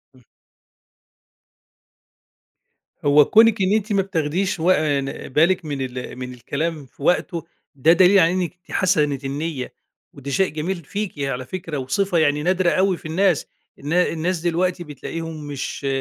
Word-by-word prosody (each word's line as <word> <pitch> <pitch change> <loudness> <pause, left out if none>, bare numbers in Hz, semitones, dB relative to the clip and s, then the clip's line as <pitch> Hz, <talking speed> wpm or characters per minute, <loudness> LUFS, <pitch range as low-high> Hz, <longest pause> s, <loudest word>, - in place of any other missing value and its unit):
إمم. 125 - -21 2.8
هو 145 +1 +6
كوْنِك 225 -2 +5
إن 190 +2 +2
أنتِ 215 -1 0
ما 195 - +3
بتاخديش 185 0 -1
وق 180 +3 +4
آآ، 145 -2 +1
ن 135 0 -6
بالِك 165 +5 +2
من 145 -3 -4
ال 125 -1 -5
من 125 0 -6
الكلام 150 +5 -4
في 135 - -15
وقته، 170 0 0 0.3
ده 155 +5 +5
دليل 190 +2 +6
على 170 -1 +4
إنِّك 180 -1 -3
حسنة 150 -7 +1
النيّة 140 0 -4 0.4
وده 140 0 -7
شيء 190 +5 +2
جميل 160 +5 -2
فيكِ 205 +5 -4
على 135 -2 -2
فكرة، 165 0 -5
وصِفة 170 +8 0
يعني 150 -1 +2
نادرة 185 0 +2
أوي 190 0 +2
في - - -18
الناس، 180 0 +1 0.3
الن 145 +4 -4
الناس 180 0 +1
دلوقتي 175 +1 0
بتلاقيهم 155 +1 -7
مش 140 0 -5
165 Hz, 150 wpm, -22 LUFS, 145-185 Hz, 2.8 s, هو